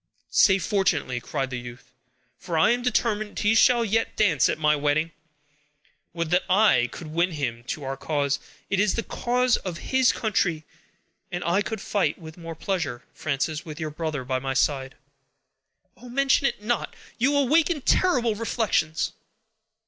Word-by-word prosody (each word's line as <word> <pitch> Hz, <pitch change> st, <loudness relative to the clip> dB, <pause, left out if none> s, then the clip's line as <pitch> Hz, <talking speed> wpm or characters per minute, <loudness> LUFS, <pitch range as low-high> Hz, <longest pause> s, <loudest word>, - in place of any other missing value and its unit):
"Say 190 Hz, -2 st, +5 dB
fortunately," 175 Hz, -10 st, 0 dB
cried 135 Hz, +2 st, -3 dB
the 125 Hz, -, -3 dB
youth, 120 Hz, 0 st, -11 dB, 0.5 s
"for 170 Hz, -3 st, -3 dB
I 160 Hz, -, +5 dB
am 245 Hz, +1 st, +1 dB
determined 215 Hz, -4 st, 0 dB
he 210 Hz, +1 st, +2 dB
shall 235 Hz, +1 st, +5 dB
yet 225 Hz, +2 st, 0 dB
dance 175 Hz, -, +3 dB
at -, -, -1 dB
my 150 Hz, -1 st, +3 dB
wedding. 150 Hz, +3 st, 0 dB, 1.0 s
Would 170 Hz, -1 st, -3 dB
that 180 Hz, +1 st, +4 dB
I 185 Hz, -, +4 dB
could 170 Hz, -, -8 dB
win 170 Hz, +3 st, 0 dB
him 120 Hz, -6 st, -3 dB
to 145 Hz, +4 st, -5 dB
our 135 Hz, 0 st, -3 dB
cause. 145 Hz, 0 st, -1 dB, 0.3 s
It 195 Hz, -, +2 dB
is 205 Hz, -2 st, +2 dB
the 230 Hz, -, -1 dB
cause 250 Hz, +1 st, +1 dB
of 180 Hz, -3 st, -6 dB, 0.2 s
his 260 Hz, -1 st, +5 dB
country; 185 Hz, -8 st, 0 dB, 0.7 s
and 175 Hz, 0 st, -3 dB
I 175 Hz, +4 st, +2 dB
could 220 Hz, -1 st, -4 dB
fight 205 Hz, -2 st, 0 dB
with 160 Hz, -2 st, -11 dB
more 165 Hz, -1 st, -8 dB
pleasure, 160 Hz, -9 st, -3 dB
Frances, 150 Hz, +2 st, -2 dB
with 155 Hz, -2 st, -9 dB
your 155 Hz, -2 st, -3 dB
brother 155 Hz, -3 st, -3 dB
by 130 Hz, 0 st, -1 dB
my 135 Hz, 0 st, -3 dB
side." 135 Hz, -1 st, 0 dB, 1.0 s
"Oh! 245 Hz, +1 st, -13 dB
mention 275 Hz, +2 st, +2 dB
it 210 Hz, -, -4 dB
not! 240 Hz, +2 st, -2 dB, 0.2 s
You 280 Hz, +4 st, +3 dB
awaken 300 Hz, +3 st, +2 dB
terrible 250 Hz, -9 st, +2 dB
reflections." 210 Hz, -8 st, -1 dB
175 Hz, 165 wpm, -25 LUFS, 150-225 Hz, 1.0 s, Say